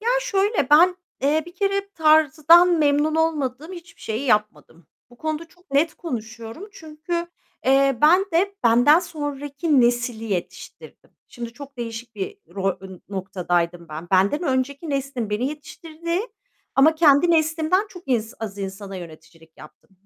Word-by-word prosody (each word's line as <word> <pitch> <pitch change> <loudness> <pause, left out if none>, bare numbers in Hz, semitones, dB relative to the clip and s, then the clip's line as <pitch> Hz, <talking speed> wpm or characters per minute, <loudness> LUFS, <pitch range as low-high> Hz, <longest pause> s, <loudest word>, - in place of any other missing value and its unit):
Ya, 450 - -2
şöyle, 395 - 0
ben, 350 +4 +6 0.3
eee, 300 +3 +2
bir 345 - -12
kere 395 +1 -1
tarzdan 315 +2 +5
memnun 295 +1 +2
olmadığım 310 -1 -1
hiçbir 350 0 -12
şeyi 225 +6 -4
yapmadım. 175 - -1 0.2
Bu 245 - -18
konuda 315 +1 -3
çok 355 -3 -27
net 295 +4 +2
konuşuyorum 230 - -7
çünkü, 330 +1 -5 0.4
eee, 270 -1 +3
ben 335 +5 +6
de 390 +4 +1
benden 245 +7 +6
sonraki 290 -2 -1
nesli 240 -1 0
yetiştirdim. 195 -6 -7 0.2
Şimdi 235 -1 -8
çok 280 +1 -12
değişik 230 0 -7
bir 195 -2 -5 0.2
rol, 195 -1 -2
eee, 190 - -9 0.2
noktadaydım 175 -3 -2
ben. 155 +3 -8
Benden 195 - +2
önceki 280 +2 -2
neslin 275 -5 -3
beni 210 +5 -1
yetiştirdiği 330 - -5 0.5
ama 300 +4 +5
kendi 310 +1 +5
neslimden 320 +4 +1
çok 360 -3 -12
in 240 -4 +1 0.2
az 205 -3 -6
insana 195 0 -6
yöneticilik 165 -1 -13
yaptım. 155 - -16
280 Hz, 140 wpm, -22 LUFS, 225-325 Hz, 0.5 s, ben